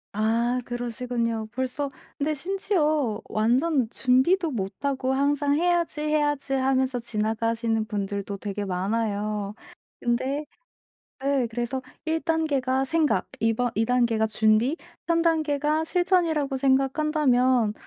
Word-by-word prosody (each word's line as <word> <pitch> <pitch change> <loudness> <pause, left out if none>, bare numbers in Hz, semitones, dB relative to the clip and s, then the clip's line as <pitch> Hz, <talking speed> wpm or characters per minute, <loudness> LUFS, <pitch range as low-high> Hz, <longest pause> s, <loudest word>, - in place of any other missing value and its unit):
아, 230 +3 +1
그러시군요. 240 -2 -2
벌써 260 +3 -2 0.3
근데 305 +2 0
심지어 310 - 0
완전 245 +3 +2
준비도 285 +8 +2
못 195 -5 -3
하고 265 -1 0
항상 285 +1 +2
'해야지, 345 -3 +1
해야지.' 295 -2 0
하면서 260 -1 +1
지나가시는 225 0 -1
분들도 200 -1 -3
되게 205 0 -4
많아요. 205 +1 -2 0.4
근데 260 +5 -1 0.8
네, 275 -2 +1
그래서 240 +3 -3 0.2
1 320 0 0
단계가 280 -6 +1
생각, 315 +2 +1
2 225 0 +2
번 245 +2 0
2 225 +1 +2
단계가 235 -3 +2
준비, 220 +5 +2 0.3
3 335 0 +3
단계가 310 -2 +1
실천이라고 325 -6 +1
생각한다면 265 -4 +2
260 Hz, 250 characters per minute, -25 LUFS, 225-300 Hz, 0.8 s, 3